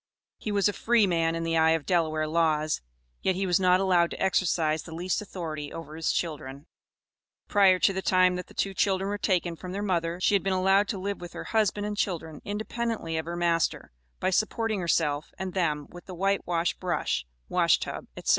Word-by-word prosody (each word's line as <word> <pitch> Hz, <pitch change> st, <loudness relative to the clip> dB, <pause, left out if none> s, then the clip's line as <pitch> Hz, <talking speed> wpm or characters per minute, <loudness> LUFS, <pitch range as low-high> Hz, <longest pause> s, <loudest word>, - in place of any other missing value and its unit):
He 215 Hz, -, -4 dB
was 200 Hz, -1 st, +3 dB
a 205 Hz, -, 0 dB
"free 230 Hz, 0 st, +3 dB
man" 165 Hz, -3 st, +1 dB
in 165 Hz, -, -2 dB
the 165 Hz, 0 st, 0 dB
eye 160 Hz, 0 st, +5 dB
of 155 Hz, -, -12 dB
Delaware 160 Hz, -3 st, +1 dB
laws, 155 Hz, -1 st, +1 dB, 0.4 s
yet 190 Hz, -, +1 dB
he 195 Hz, +1 st, -1 dB
was 180 Hz, -1 st, +2 dB
not 185 Hz, -1 st, +4 dB
allowed 180 Hz, -3 st, +3 dB
to -, -, -7 dB
exercise 165 Hz, -5 st, +1 dB
the 165 Hz, -, -9 dB
least 180 Hz, +4 st, -1 dB
authority 160 Hz, -7 st, -6 dB
over 155 Hz, -2 st, -8 dB
his 160 Hz, 0 st, 0 dB
children. 145 Hz, -4 st, -4 dB, 0.8 s
Prior 195 Hz, -3 st, +5 dB
to 195 Hz, -, +3 dB
the 190 Hz, -, -2 dB
time 185 Hz, -1 st, +3 dB
that 180 Hz, -, -5 dB
the -, -, -17 dB
two 195 Hz, -, -1 dB
children 190 Hz, 0 st, +1 dB
were 205 Hz, -, -3 dB
taken 180 Hz, -3 st, 0 dB
from 180 Hz, +2 st, -8 dB
their 200 Hz, +1 st, -3 dB
mother, 170 Hz, -3 st, -1 dB
she 185 Hz, -, +2 dB
had 200 Hz, -, +4 dB
been 195 Hz, +1 st, 0 dB
allowed 195 Hz, +2 st, +3 dB
to 200 Hz, -, -3 dB
live 200 Hz, +1 st, -4 dB
with 175 Hz, -1 st, -8 dB
her -, -, -6 dB
husband 210 Hz, -2 st, 0 dB
and 210 Hz, 0 st, -3 dB
children, 160 Hz, -6 st, -2 dB
independently 220 Hz, -3 st, -3 dB
of 160 Hz, -, -2 dB
her 170 Hz, +1 st, -4 dB
master, 170 Hz, -, 0 dB, 0.3 s
by -, -, 0 dB
supporting 215 Hz, +1 st, 0 dB
herself 155 Hz, -4 st, 0 dB
and 190 Hz, -1 st, -4 dB
them 150 Hz, -6 st, 0 dB
with 175 Hz, +2 st, -12 dB
the 185 Hz, -, -7 dB
white 195 Hz, +2 st, 0 dB
wash 170 Hz, 0 st, +1 dB
brush, 175 Hz, -, -2 dB, 0.2 s
wash -, -, +3 dB
tub, -, -, -6 dB
etc. -, -, -4 dB
180 Hz, 210 wpm, -27 LUFS, 165-195 Hz, 0.8 s, eye